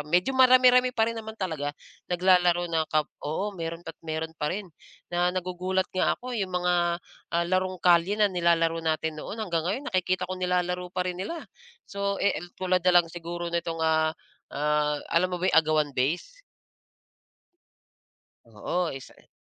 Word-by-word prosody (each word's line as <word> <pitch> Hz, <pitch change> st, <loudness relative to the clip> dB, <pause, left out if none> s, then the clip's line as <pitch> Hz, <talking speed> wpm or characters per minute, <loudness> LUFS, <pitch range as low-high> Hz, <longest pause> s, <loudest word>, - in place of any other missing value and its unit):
medyo 175 Hz, -, +1 dB
marami-rami 255 Hz, -1 st, +5 dB
pa 220 Hz, -, +4 dB
rin 230 Hz, -, -1 dB
naman 220 Hz, 0 st, -8 dB
talaga 155 Hz, -7 st, -3 dB, 0.3 s
naglalaro 180 Hz, -1 st, +3 dB
na 160 Hz, -1 st, +1 dB
kap 155 Hz, -1 st, +2 dB, 0.2 s
oo, 195 Hz, +8 st, -2 dB
meron 165 Hz, -1 st, -6 dB
at 165 Hz, -, -9 dB
meron 160 Hz, 0 st, -4 dB
pa 150 Hz, -2 st, -3 dB
rin. 200 Hz, +4 st, -3 dB, 0.5 s
Na 175 Hz, +1 st, +2 dB
nagugulat 185 Hz, +1 st, -1 dB
nga 185 Hz, -, +1 dB
ako 250 Hz, 0 st, -7 dB
yong 205 Hz, -5 st, -1 dB
mga, 180 Hz, 0 st, +1 dB, 0.6 s
ah, 170 Hz, -, +2 dB
larong 185 Hz, +1 st, 0 dB
kalye 175 Hz, +3 st, +4 dB
na 210 Hz, -2 st, +3 dB
nilalaro 165 Hz, -2 st, +2 dB
natin 160 Hz, -1 st, -1 dB
noon, -, -, -6 dB
hanggang 180 Hz, -7 st, -1 dB
ngayon 255 Hz, +9 st, -2 dB
nakikita 185 Hz, 0 st, +1 dB
ko 185 Hz, 0 st, -6 dB
nilalaro 180 Hz, 0 st, 0 dB
pa 180 Hz, 0 st, -2 dB
rin 180 Hz, 0 st, -3 dB
nila. 330 Hz, -, -5 dB, 0.4 s
So, 200 Hz, 0 st, -2 dB
eh, 200 Hz, -, +1 dB, 0.2 s
tulad 185 Hz, -1 st, +1 dB
na 180 Hz, +1 st, +3 dB
lang 165 Hz, -, -13 dB
siguro 170 Hz, 0 st, -5 dB
nitong, 165 Hz, -1 st, -2 dB
ah, 160 Hz, 0 st, +2 dB, 0.4 s
ah, 150 Hz, 0 st, +1 dB, 0.2 s
alam 175 Hz, +2 st, +3 dB
mo 180 Hz, -, -3 dB
ba 175 Hz, -, -4 dB
yung -, -, +7 dB
agawan 155 Hz, -2 st, +1 dB
base? 170 Hz, -, -2 dB, 2.0 s
Oo, 175 Hz, -2 st, -2 dB
isa, 135 Hz, -1 st, -10 dB
eh -, -, -23 dB
180 Hz, 165 wpm, -27 LUFS, 165-185 Hz, 2.0 s, yung